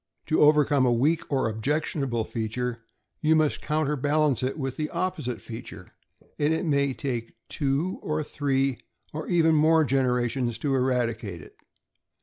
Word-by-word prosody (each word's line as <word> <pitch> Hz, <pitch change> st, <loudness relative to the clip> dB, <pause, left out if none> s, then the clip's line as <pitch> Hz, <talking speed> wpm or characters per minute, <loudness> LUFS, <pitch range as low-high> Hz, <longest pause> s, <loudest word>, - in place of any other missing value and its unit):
To 155 Hz, -, +1 dB
overcome 150 Hz, -2 st, +5 dB
a -, -, +3 dB
weak 150 Hz, +9 st, +1 dB
or 135 Hz, -4 st, +1 dB
objectionable 130 Hz, +1 st, -1 dB
feature, 115 Hz, +2 st, -3 dB, 0.4 s
you 160 Hz, 0 st, +4 dB
must 155 Hz, -2 st, +1 dB
counter 150 Hz, -1 st, 0 dB
balance 145 Hz, -1 st, +1 dB
it 130 Hz, +3 st, -2 dB
with 135 Hz, -3 st, -3 dB
the 155 Hz, +1 st, -3 dB
opposite 170 Hz, -8 st, -3 dB
feature; 115 Hz, -1 st, -9 dB, 0.5 s
and 145 Hz, +1 st, +2 dB
it 160 Hz, -, -2 dB
may 140 Hz, -3 st, +2 dB
take 125 Hz, -4 st, -4 dB
two 145 Hz, +6 st, -1 dB
or 155 Hz, 0 st, -2 dB
three, 135 Hz, -3 st, 0 dB, 0.3 s
or 155 Hz, +1 st, -5 dB
even 165 Hz, -2 st, +3 dB
more 160 Hz, +1 st, +4 dB
generations, 125 Hz, -3 st, 0 dB
to 140 Hz, +3 st, -1 dB
eradicate 115 Hz, -, -1 dB
it. -, -, -16 dB
140 Hz, 145 wpm, -26 LUFS, 125-155 Hz, 0.5 s, overcome